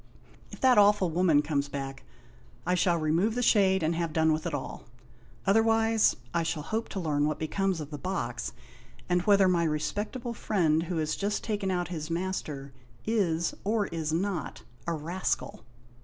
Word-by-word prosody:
If - - -11
that 255 -4 +6
awful 205 -4 +4
woman 165 -3 +3
comes 140 -2 -1
back 135 -1 -6 0.6
I 180 - +1
shall 175 -1 +2
remove 165 +8 +1
the 245 - 0
shade 190 -5 +4
and 160 +2 +1
have 170 -1 -2
done 160 0 +3
with 155 +2 -2
it 165 - -4
all. 135 - -6 0.6
Otherwise, 225 +1 +3 0.2
I 170 - +2
shall 160 -2 -2
hope 220 +7 -3
to 195 - -4
learn 150 -4 +1
what 155 - -1
becomes 190 +3 -1
of 150 -1 -7
the 145 - -6
box, 190 +4 -3 0.6
and 180 0 +2
whether 200 -2 +6
my 175 -2 +2
respectable 205 - -2
friend 165 -9 +1
who 170 +1 -3
has 155 -1 0
just 205 +1 -2
taken 205 -3 -2
out 180 -2 -1
his 160 -3 -5
master 165 -6 -3 0.3
is, 175 -7 +1
or 210 0 +1
is 160 -2 -3
not, 175 0 -2 0.2
a 170 - 0
rascal." 165 +4 -3
175 Hz, 170 wpm, -28 LUFS, 155-200 Hz, 0.6 s, that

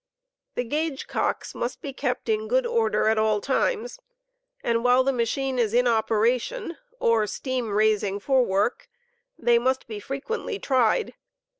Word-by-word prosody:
The - - 0
gauge 295 +3 -2
cooks - - -2
must 240 - -4
be 275 - -6
kept - - -2
in 440 -1 0
good - - +2
orde* 465 -2 +1
at 220 0 +3
all 215 -1 +2
times, 480 - -1 0.7
atfd 230 -1 +1
while 250 +1 +4
the 270 +1 +1
ma 235 -2 +1
chine 265 +2 -2
is 230 -1 +1
in 250 0 +4
operation, 235 - +1 0.2
or 225 -2 +2
steam 255 +1 -3
raising 205 -1 +1
for 260 +4 +3
work, 200 +2 -1 0.5
they 235 -1 +3
must 260 +2 0
be 215 -2 -6
frequently 275 - -4
tried. 265 - +1
250 Hz, 155 wpm, -25 LUFS, 220-290 Hz, 0.7 s, while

